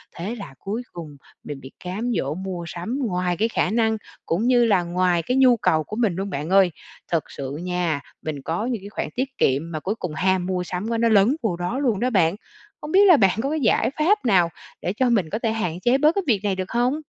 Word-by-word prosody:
Thế 195 +8 -4
là 200 - -9
cuối 220 +5 -4
cùng 155 -5 -9 0.3
mình 145 -2 -7
bị 130 - -11
cám 210 +7 -3
dỗ 140 +2 -2
mua 185 -1 -5
sắm 200 +12 -4
ngoài 180 -3 -1
cái 220 +2 +2
khả - - 0
năng 220 -1 +2 0.3
cũng 175 +7 0
như 245 -2 +5
là 195 -5 +3
ngoài 175 -1 +1
cái 250 +1 0
nhu 255 -3 +6
cầu 155 -6 +2
của 210 - -7
mình 220 -7 +1
luôn 195 +1 -3
bạn 150 +2 -4
ơi. 190 -2 +5 0.4
Thật 165 -2 +1
sự 135 -1 -6
nha, 175 -5 -1 0.2
mình 150 -3 -5
có 170 - -2
những 240 -6 -2
cái 200 - -8
khoản - - -4
tiết 265 +1 -3
kiệm 145 +6 +1
mà 155 - -3
cuối 205 +4 -2
cùng 180 -8 -5
ham 185 0 +1
mua 180 -1 -1
sắm 180 +4 -4
quá 230 - 0
nó 230 0 +2
lấn 215 +6 +4
vô 190 -6 0
đó 180 +10 -2
luôn 235 -8 +1
đó 250 - +1
bạn. 175 -3 +3 0.5
Hông 300 - -6
biết 400 +2 +6
là 350 -5 +8
bạn 195 +1 +3
có 275 - 0
cái 315 - 0
giải 235 +2 +2
pháp 390 - +2
nào 180 -6 +4 0.3
để 180 - -2
cho 255 +2 +1
mình 195 -9 +1
có 215 - -3
thể 225 -2 0
hạn 180 -6 -2
chế 245 +6 +3
bớt 305 +5 +3
cái 395 - +1
việc 215 -6 +3
này 200 -2 0
được 185 0 -5
hông? 250 +6 +1
195 Hz, 250 wpm, -23 LUFS, 175-235 Hz, 0.5 s, là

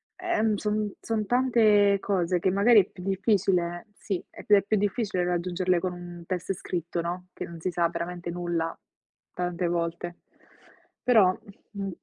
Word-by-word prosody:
Ehm, 225 - +1
son 210 0 -1
son 220 -2 -1
tante 215 -5 +4
cose 180 -3 0
che 185 - +1
magari 210 +3 +6
è 185 - -8
più 180 - -11
difficile 190 -2 +1
Sì, 195 -4 -3
è - - -11
più 205 -2 +5
più 215 - +1
difficile 200 -3 0
raggiungerle 180 0 0
con 185 +1 -2
un 175 -1 -9
test 185 +1 -2
scritto, 170 -1 -3
no, 180 +2 -4
che - - -6
non 170 -1 -10
si 185 - -2
sa 170 -1 +1
veramente 175 +1 -5
nulla 170 -1 -2 0.6
tante 175 0 -2
volte. 170 0 -3 0.8
Però, 210 -7 +5 0.3
mh 200 -2 -4
185 Hz, 155 wpm, -27 LUFS, 175-205 Hz, 0.8 s, magari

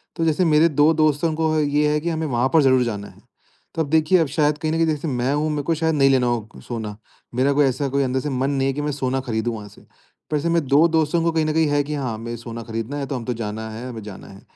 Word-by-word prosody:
तो 165 - -1
जैसे 160 +3 +2
मेरे 155 0 +5
2 150 +2 +4
दोस्तों 155 +1 +1
को 160 0 0
है 155 -1 +2
ये 150 +1 +2
है 150 - +1
कि 170 - -2
हमें 160 -1 -2
वहाँ 125 -1 +1
पर 160 - +6
ज़रूर 130 -2 +4
जाना 105 -4 -4
है। - - -17 0.5
तो 165 - 0
अब 150 - -2
देखिए, 160 +4 +4
अब 160 - +2
शायद 150 +1 +1
कहीं 155 0 -2
न - - 0
कहीं 165 0 +2
जैसे 155 0 -1
मैं 130 -1 0
हूँ 150 +2 0
मेरे 150 -1 -2
को 165 - 0
शायद 160 0 0
नहीं 135 -2 +4
लेना 130 -2 +3
हो 115 -3 -2 0.2
सोना। 110 -4 -5 0.4
मेरा 135 +3 +2
कोई 145 0 +4
ऐसा 135 +2 0
कोई 140 +1 +1
अंदर 130 0 0
से 150 - -3
मन 135 0 -1
नहीं 135 -1 0
है 135 - 0
कि 145 - -3
मैं 150 0 -1
सोना 135 -2 -1
खरीदूँ 120 -2 -2
वहाँ 105 -1 -8
से। - - -18 0.5
वैसे 150 +3 0
मैं 165 -2 +1
2 145 +5 +5
दोस्तों 160 0 +1
को 170 - +2
कहीं 160 -1 +1
न 155 - 0
कहीं 160 0 +2
है 145 0 +2
कि 150 +2 -5
हाँ, 130 -5 -3
हमें 115 +2 -6
सोना 115 0 -7
खरीदना 115 +4 -5
है 140 - -3
तो 135 - -3
हम 120 -2 -5
तो 125 - -1
जाना 110 -1 -5
है, 115 +3 -7
हमें 115 -3 -7
जाना 105 -2 -10
है। 100 0 -13
140 Hz, 295 wpm, -22 LUFS, 120-155 Hz, 0.5 s, पर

